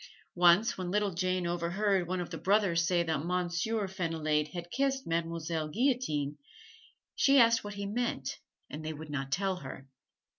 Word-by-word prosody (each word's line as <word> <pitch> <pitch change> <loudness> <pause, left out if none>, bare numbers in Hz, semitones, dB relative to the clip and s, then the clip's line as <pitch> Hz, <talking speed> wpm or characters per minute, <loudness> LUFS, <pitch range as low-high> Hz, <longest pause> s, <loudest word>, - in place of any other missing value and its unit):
Once, 180 +6 +4
when 180 -1 -3
little 205 0 +1
Jane 185 +1 0
overheard 175 +2 0
one 185 +1 -2
of 175 - -5
the - - -4
brothers 190 -4 +2
say 175 -2 +2
that 160 -3 -1
Monsieur 180 +4 -1
Fenillade 160 -5 -1
had 175 +1 -7
kissed 270 0 0
Mademoiselle 165 -1 -2
Guillotine, 155 - 0 0.8
she 275 0 +4
asked 230 -2 +5
what 205 0 -6
he 200 0 -4
meant 235 +4 -2 0.3
and 155 +1 -7
they 155 0 -3
would 155 0 -9
not 135 -1 -3
tell 190 +3 0
her. 135 -5 -9
175 Hz, 160 wpm, -31 LUFS, 165-205 Hz, 0.8 s, asked